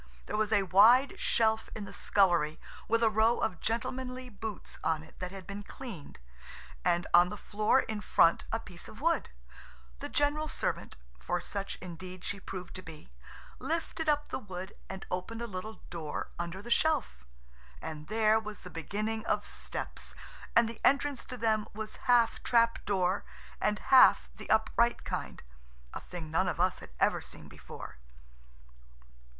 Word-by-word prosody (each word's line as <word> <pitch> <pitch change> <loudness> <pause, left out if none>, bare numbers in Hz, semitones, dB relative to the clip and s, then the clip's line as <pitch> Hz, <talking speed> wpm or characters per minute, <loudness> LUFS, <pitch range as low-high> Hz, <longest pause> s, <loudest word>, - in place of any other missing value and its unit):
There - - -3
was 215 0 +1
a 205 -2 +4
wide 225 +9 +6
shelf 220 -1 +2
in 210 - -5
the - - -10
scullery 175 -6 +2 0.3
with 230 +1 +2
a 225 - +6
row 220 +2 +4
of 180 - -1
gentlemanly 255 +2 -3
boots 215 -2 -7
on 160 -1 +1
it 160 - -17
that 185 +1 -6
been 200 +1 -6
cleaned, 205 - -9 0.7
and 175 +1 +2
on 175 +1 +7
the 210 - -6
floor 215 +6 +2
in 215 -1 -4
front 165 - +4
a 225 - 0
piece 180 -6 -10
of 215 - -12
wood. 330 +1 +1 0.7
The - - -5
general 295 +2 +1
servant–for - - -3
such 200 +2 -4
indeed 180 +1 -8
she 200 - -3
proved 185 -1 -7
to - - -7
be–lifted 185 - -5
up 295 0 +1
the - - -2
wood 190 -3 -7 0.2
and 190 0 -6
opened 185 +6 -3
a 235 - -3
little 215 +1 -6
door 160 -4 -4
under 170 +3 -4
the 240 - -7
shelf. 290 - +1 0.6
And 155 -1 -7
there 220 0 +4
was 215 -1 -8
the 180 - -10
beginning 215 +7 -3
of - - +1
steps, - - -6 0.4
and 235 0 +6
the 230 0 -8
entrance 280 -1 +3
to 250 - -7
them 220 -2 +1
was 220 0 -5
half 240 -2 +4
trap 230 -1 +3
door, 190 -1 +1 0.4
and 210 0 +2
half 265 +2 +6
the - - -10
upright 230 +2 +3
kind–a - - -7
thing 165 -3 -8
none 185 +3 +2
of 175 - -2
us 185 +1 +2
had - - -11 0.3
seen - - -11
before. - - -10
210 Hz, 155 wpm, -31 LUFS, 180-230 Hz, 0.7 s, on